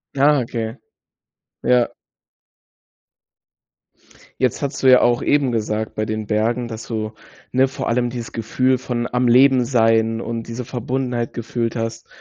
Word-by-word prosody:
Ah, 145 Hz, +1 st, +4 dB
okay. 115 Hz, 0 st, -4 dB, 0.9 s
Ja. 125 Hz, -1 st, +3 dB, 2.5 s
Jetzt 130 Hz, +2 st, +1 dB
hattest 140 Hz, -1 st, -3 dB
du 130 Hz, -, +5 dB
ja 125 Hz, -, +7 dB
auch 120 Hz, 0 st, +2 dB
eben 145 Hz, -3 st, +2 dB
gesagt 110 Hz, -1 st, -2 dB
bei 110 Hz, -, -1 dB
den 110 Hz, 0 st, -4 dB
Bergen, 115 Hz, +3 st, 0 dB
dass 110 Hz, -1 st, -7 dB
du, 110 Hz, -2 st, -3 dB, 0.4 s
ne, 130 Hz, +1 st, +3 dB
vor 135 Hz, -, -5 dB
allem 120 Hz, 0 st, +1 dB
„dieses 120 Hz, -2 st, -6 dB
Gefühl 130 Hz, +3 st, +1 dB
von 120 Hz, -2 st, -3 dB
am 125 Hz, 0 st, +1 dB
Leben 130 Hz, +1 st, +5 dB
Sein 115 Hz, -2 st, +2 dB
und 115 Hz, -1 st, -4 dB
diese 115 Hz, +2 st, -5 dB
Verbundenheit 125 Hz, 0 st, -3 dB
gefühlt 115 Hz, 0 st, -3 dB
hast 115 Hz, 0 st, -4 dB
120 Hz, 145 wpm, -20 LUFS, 115-125 Hz, 2.5 s, ja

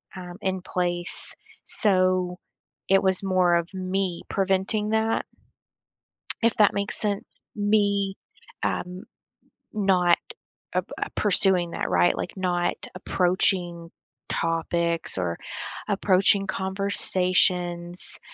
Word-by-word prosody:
um, 180 Hz, -1 st, -8 dB
in 190 Hz, -2 st, -1 dB
place. 175 Hz, -1 st, -1 dB, 0.3 s
So, 185 Hz, -3 st, +2 dB, 0.5 s
it 195 Hz, 0 st, +5 dB
was 190 Hz, 0 st, +1 dB
more 185 Hz, -2 st, +3 dB
of 170 Hz, +2 st, -1 dB
me 185 Hz, -1 st, -2 dB
preventing 195 Hz, +2 st, 0 dB
that 220 Hz, +1 st, +1 dB, 1.2 s
if 230 Hz, 0 st, +3 dB
that 210 Hz, -2 st, +5 dB
makes 200 Hz, 0 st, -1 dB
sense. 205 Hz, -2 st, -1 dB, 0.3 s
Me, 205 Hz, -1 st, +2 dB, 0.5 s
um, 180 Hz, +1 st, -2 dB, 0.7 s
not, 185 Hz, -4 st, +3 dB, 0.6 s
uh, -, -, +2 dB, 0.2 s
ap -, -, 0 dB
uh, -, -, -9 dB
pursuing 185 Hz, -3 st, +2 dB
that, -, -, -3 dB
right? 175 Hz, -, +3 dB
Like, -, -, -4 dB
not 175 Hz, -2 st, 0 dB, 0.2 s
approaching 180 Hz, -2 st, 0 dB, 0.4 s
topics 165 Hz, -, -1 dB
or 85 Hz, -2 st, -1 dB, 0.5 s
approaching 195 Hz, 0 st, +3 dB
conversations, 185 Hz, -2 st, +1 dB
185 Hz, 100 wpm, -25 LUFS, 175-195 Hz, 1.2 s, it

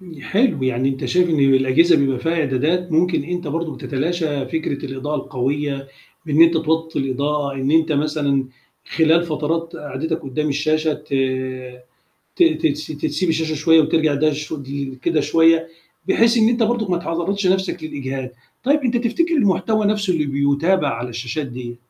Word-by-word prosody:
ن 170 Hz, -6 st, -12 dB
حلو، 220 Hz, -, +1 dB
يعني 130 Hz, 0 st, 0 dB
أنت 135 Hz, -1 st, -3 dB
شايف 180 Hz, 0 st, +2 dB
إن 160 Hz, -, +1 dB
الأجهزة 135 Hz, +5 st, +4 dB
بيبقى 135 Hz, -3 st, +1 dB
فيها 160 Hz, +7 st, -1 dB
إعدادات 160 Hz, +4 st, 0 dB
ممكن 170 Hz, 0 st, +2 dB
أنت 175 Hz, +1 st, -4 dB
برضه 160 Hz, +2 st, -3 dB
بتتلاشى 150 Hz, -1 st, -2 dB
فكرة 140 Hz, 0 st, -3 dB
الإضاءة 135 Hz, +3 st, -4 dB
القوية 135 Hz, +1 st, -3 dB, 0.4 s
بإن 155 Hz, +1 st, +5 dB
أنت 165 Hz, 0 st, +5 dB
توطّي 160 Hz, 0 st, -1 dB
الإضاءة، 140 Hz, +1 st, -1 dB
إن 135 Hz, +1 st, -2 dB
أنت 160 Hz, 0 st, +3 dB
مثلًا 145 Hz, -2 st, 0 dB, 0.4 s
خلال 160 Hz, +1 st, +3 dB
فترات 165 Hz, +1 st, -3 dB
قعدتك 155 Hz, +2 st, -4 dB
قُدّام 150 Hz, +2 st, -2 dB
الشاشة 155 Hz, +2 st, 0 dB
ت 150 Hz, -2 st, -7 dB, 1.2 s
ت -, -, +4 dB, 0.2 s
تس 150 Hz, 0 st, -2 dB
تسيب 155 Hz, +4 st, -2 dB
الشاشة 160 Hz, -1 st, 0 dB
شوية 160 Hz, +2 st, +4 dB
وترجع 155 Hz, 0 st, +2 dB
ده 155 Hz, +2 st, +2 dB
شدي 140 Hz, -2 st, -6 dB
كده 165 Hz, -2 st, +1 dB
شوية 165 Hz, +2 st, +3 dB, 0.4 s
بحيث 230 Hz, +1 st, +4 dB
إن 220 Hz, 0 st, +5 dB
أنت 235 Hz, 0 st, +1 dB
برضُك 225 Hz, -3 st, 0 dB
ما 175 Hz, -, +1 dB
تعرّضش 175 Hz, +4 st, -2 dB
نَفْسك 190 Hz, +1 st, 0 dB
للإجهاد. 135 Hz, -3 st, -5 dB, 0.3 s
طيب 290 Hz, +3 st, +3 dB
أنت 250 Hz, -3 st, 0 dB
تفتكر 290 Hz, +9 st, 0 dB
المحتوى 215 Hz, -, +1 dB
نَفْسه 205 Hz, -2 st, +1 dB
اللي 155 Hz, -3 st, 0 dB
بيُتابع 140 Hz, +6 st, +1 dB
على 115 Hz, +2 st, -4 dB
الشاشات 120 Hz, +5 st, -4 dB
ديّة، 120 Hz, -1 st, -7 dB
155 Hz, 160 wpm, -20 LUFS, 140-170 Hz, 1.2 s, بإن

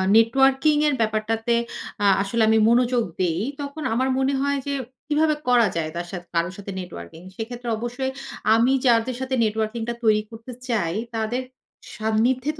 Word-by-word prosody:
networking 270 Hz, +6 st, +4 dB
এর 290 Hz, -, +2 dB
ব্যাপারটাতে 225 Hz, +2 st, 0 dB, 0.5 s
আ -, -, +3 dB, 0.2 s
আসলে 205 Hz, +4 st, -1 dB
আমি 220 Hz, -, +5 dB
মনোযোগ 240 Hz, 0 st, +3 dB, 0.2 s
দেই, 175 Hz, -2 st, +1 dB, 0.2 s
তখন 285 Hz, +2 st, -6 dB
আমার 260 Hz, +3 st, +1 dB
মনে 265 Hz, +1 st, +1 dB
হয় 280 Hz, 0 st, +1 dB
যে 280 Hz, -, -1 dB, 0.3 s
কিভাবে 305 Hz, +1 st, +2 dB
করা 240 Hz, -3 st, +5 dB
যায় 160 Hz, -2 st, -1 dB
তার 175 Hz, 0 st, -3 dB
সা 190 Hz, -, -4 dB, 0.2 s
কারো 170 Hz, 0 st, +1 dB
সাথে 200 Hz, -1 st, -7 dB
নেটওয়ার্কিং, 160 Hz, -, -9 dB
সেক্ষেত্রে 240 Hz, +1 st, -5 dB
অবশ্যই 245 Hz, +3 st, -3 dB, 0.4 s
আমি 235 Hz, +3 st, +3 dB
যাদের 240 Hz, +1 st, +3 dB
সাথে 260 Hz, 0 st, -1 dB
নেটওয়ার্কিংটা 220 Hz, +2 st, -1 dB
তৈরি 215 Hz, -1 st, +4 dB
করতে 225 Hz, +2 st, -9 dB, 0.2 s
চাই, 200 Hz, -8 st, 0 dB, 0.2 s
তাদের 225 Hz, +3 st, -1 dB, 0.5 s
সান্নিধ্যেতে 245 Hz, +7 st, 0 dB
230 Hz, 155 wpm, -23 LUFS, 215-260 Hz, 0.5 s, আমি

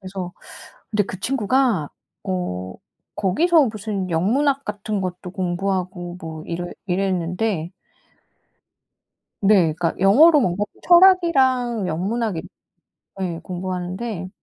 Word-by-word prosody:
그래서 185 Hz, -2 st, -6 dB, 0.6 s
근데 210 Hz, -1 st, +2 dB
그 190 Hz, -1 st, -7 dB
친구가 245 Hz, -, +1 dB, 0.4 s
어 95 Hz, -, -3 dB, 0.4 s
거기서 310 Hz, -, +3 dB
무슨 210 Hz, -4 st, -4 dB
영문학 270 Hz, -, +1 dB
같은 210 Hz, 0 st, -3 dB
것도 180 Hz, 0 st, -5 dB
공부하고 180 Hz, -1 st, -3 dB
뭐 160 Hz, -1 st, -7 dB
이래 175 Hz, +1 st, -4 dB, 0.2 s
이랬는데 180 Hz, -1 st, -1 dB, 1.7 s
네. 195 Hz, -6 st, +4 dB
그니까 165 Hz, +1 st, -1 dB
영어로 290 Hz, -, +6 dB
뭔가 190 Hz, 0 st, 0 dB, 0.2 s
철학이랑 270 Hz, -, +4 dB
영문학을 195 Hz, +2 st, -2 dB, 0.8 s
예 170 Hz, -3 st, -3 dB
공부하는데 185 Hz, +2 st, -4 dB
190 Hz, 235 characters per minute, -22 LUFS, 175-230 Hz, 1.7 s, 영어로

